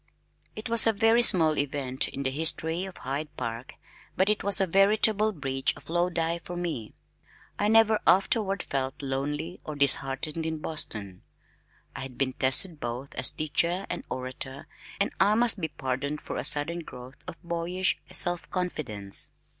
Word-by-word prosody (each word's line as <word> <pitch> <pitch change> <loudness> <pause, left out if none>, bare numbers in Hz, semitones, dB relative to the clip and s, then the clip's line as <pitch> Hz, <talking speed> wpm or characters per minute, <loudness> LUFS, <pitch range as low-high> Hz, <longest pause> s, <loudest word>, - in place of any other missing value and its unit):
It 215 - -6
was 230 0 +8
a 225 - +4
very 225 +3 +3
small 160 -9 +6
event 135 -2 -2
in 140 - -6
the 130 - 0
history 160 +4 0
of 190 - -10
Hyde 140 +4 -4
Park, 115 +1 -6 0.4
but 195 +3 +3
it 210 - -2
was 200 -1 +6
a 190 - +3
veritable 210 +3 +3
bridge 135 -6 -1
of - - -13
Lodi 170 -1 0
for 175 +1 -8
me. 160 -11 -5 0.6
I 205 - +1
never 220 0 +4
afterward 195 0 +2
felt 135 +1 -4
lonely 145 +5 -4
or 155 - -7
disheartened 140 +3 0
in 160 0 -3
Boston. 105 - -3 0.7
I - - -6
had 130 -2 -7
been 130 -1 -1
tested 145 +6 +3
both 125 +3 -6
as 130 - +3
teacher 170 +5 -1
and 175 - -5
orator 130 +1 -6 0.3
and 200 - +1
I 205 +2 +4
must 230 -3 +3
be 160 - -1
pardoned 140 0 -4
for - - -7
a - - -3
sudden 155 +4 0
growth 130 -5 -11
of - - -6
boyish 170 +2 -2
self 175 -1 +1
confidence. 110 - -3
160 Hz, 160 wpm, -27 LUFS, 135-190 Hz, 0.7 s, was